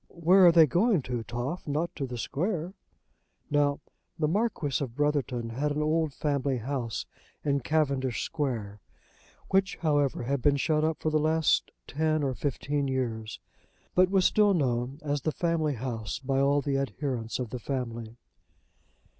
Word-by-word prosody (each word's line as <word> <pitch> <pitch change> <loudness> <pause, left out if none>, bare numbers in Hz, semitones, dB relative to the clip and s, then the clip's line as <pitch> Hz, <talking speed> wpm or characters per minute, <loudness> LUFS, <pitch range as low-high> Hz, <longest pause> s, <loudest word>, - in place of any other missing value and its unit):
"Where 180 +2 +5
are - - +8
they 165 -1 +7
going 180 - +2
to, 125 -2 -3
Toff? 120 +10 -4
Not 155 +4 -1
to 140 -3 -3
the 125 -1 -6
Square?" 170 - -2 0.8
Now 145 0 +2 0.4
the 155 - +1
Marquis 170 - 0
of 120 -4 -6
Brotherton 135 -5 0
had 140 +6 -1
an 150 +1 0
old 160 0 +1
family 140 -2 -1
house 120 -2 -3 0.4
in 140 -1 +2
Cavendish 140 -3 0
Square, 115 -9 -3 0.7
which, 190 0 +2
however, 145 -6 +1
had 135 +2 -1
been 140 +2 +3
shut 155 +2 +1
up 160 0 0
for 155 - -1
the 155 - +3
last 155 +1 +2 0.2
ten 155 - 0
or 135 -2 0
fifteen 140 +1 -2
years, 115 -5 -3 0.5
but 185 0 +4
was 190 -1 +3
still 205 -2 +4
known 125 -3 0
as 145 -1 -1
the 155 - 0
family 160 -3 0
house 115 -3 -4
by 135 0 -1
all 140 +1 +3
the 135 0 0
adherents 130 -4 -3
of 125 -3 -4
the 125 - -4
family. 120 -3 -4
145 Hz, 160 wpm, -28 LUFS, 125-155 Hz, 0.8 s, are